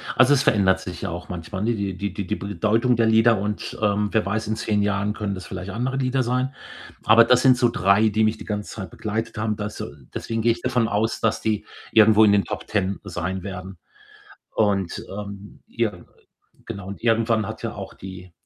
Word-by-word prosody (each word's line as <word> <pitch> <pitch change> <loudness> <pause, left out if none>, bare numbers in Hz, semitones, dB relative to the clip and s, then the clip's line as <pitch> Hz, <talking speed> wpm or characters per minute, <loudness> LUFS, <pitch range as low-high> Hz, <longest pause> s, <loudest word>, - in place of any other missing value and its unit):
Also, 130 +3 +6
es 140 -1 +3
verändert 95 -6 +3
sich 90 - -7
ja 100 - -3
auch 85 +1 -7
manchmal, 95 +3 -5
ne? 120 - +1
Die 100 -3 -3
die 100 +1 -3
die 100 -3 -4
die - - -1
B 100 - -6
bedeutung 110 +6 +2
der 115 - +3
Lieder 110 -1 +5
und 105 +1 -4
ähm, 105 0 +1
wer 110 - +1
weiß, 110 +2 -2
in 110 - -1
10 105 -2 0
Jahren 100 0 0
können 105 -2 -3
das 90 -2 -7
vielleicht 95 +1 -6
andere 125 +5 -2
Lieder 130 0 +1
sein. 125 +2 -1 0.5
Aber 115 +2 +7
das 125 +1 +4
sind 130 -2 +6
so 120 -1 +4
3, 100 0 +3
die 110 +1 +2
mich 110 0 +1
die - - -9
ganze 105 -1 -4
Zeit 100 -3 -7
begleitet 110 +2 -4
haben. 110 -1 -1
Da 105 -1 -3
so - - -6 0.2
deswegen 115 0 -3
gehe 115 0 +4
ich 115 - -8
davon 125 -3 +1
aus, 110 +2 0
dass 110 -1 +1
die 105 -1 -1 0.3
irgendwo 110 0 +7
in 105 - +5
den 100 -1 +3
Top - - -5
10 100 -2 -1
sein 95 -1 -4
werden. 95 0 -7 0.8
Und, 100 -4 0
ähm, 100 0 -8
ja, 115 -2 -1
äh, 90 - -14 0.6
genau, 100 -1 -7
und 100 - -8
irgendwann 115 -2 +2
hat 110 +1 -7
ja 115 -1 -3
auch 100 -1 -7
die 95 -1 -10
105 Hz, 220 wpm, -23 LUFS, 100-115 Hz, 0.8 s, Aber